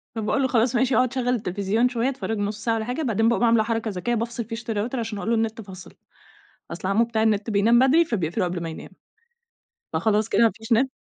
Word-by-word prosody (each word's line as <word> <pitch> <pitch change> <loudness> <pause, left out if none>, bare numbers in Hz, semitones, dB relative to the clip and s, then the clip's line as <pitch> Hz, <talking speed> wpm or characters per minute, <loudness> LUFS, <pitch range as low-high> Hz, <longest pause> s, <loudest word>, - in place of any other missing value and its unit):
فباقول 225 +5 0
له 260 - +2
خلاص 240 0 +1
ماشي 245 0 +2
أقعد 255 0 +2
شغّل 250 -2 -1
التليفزيون 215 +1 0
شوية 245 +1 0
اتفرج 235 -5 -4
نُص 205 +1 -3
ساعة 230 - +1
والَّا 220 -1 -3
حاجة، 250 +6 -3
بعدين 225 -5 +1
باقوم 235 - +1
عاملة 230 -2 +4
حركة 225 -1 -2
ذكية، 215 +6 -2
بافصل 235 0 -3
فيشة 225 0 -5
الRouter 220 +5 -2
عشان 225 -3 -3
أقول 210 - -4
له 235 - +3
النت 225 0 -2
فصل، 190 -3 -12 0.8
أصل 175 +2 -5
عمو 220 +4 +3
بتاع 220 -1 -1
النت 215 0 +1
بينام 220 +3 +4
بدري 290 +6 +4
فبيقفله 180 - -1
قبل 175 -1 -3
ما 165 - -4
ينام، 160 - -9 1.1
فخلاص 215 0 +1
كده - - +3
ما 225 - +5
فيش 225 +2 -6
نت. 255 +4 +3
225 Hz, 225 wpm, -24 LUFS, 210-240 Hz, 1.1 s, ما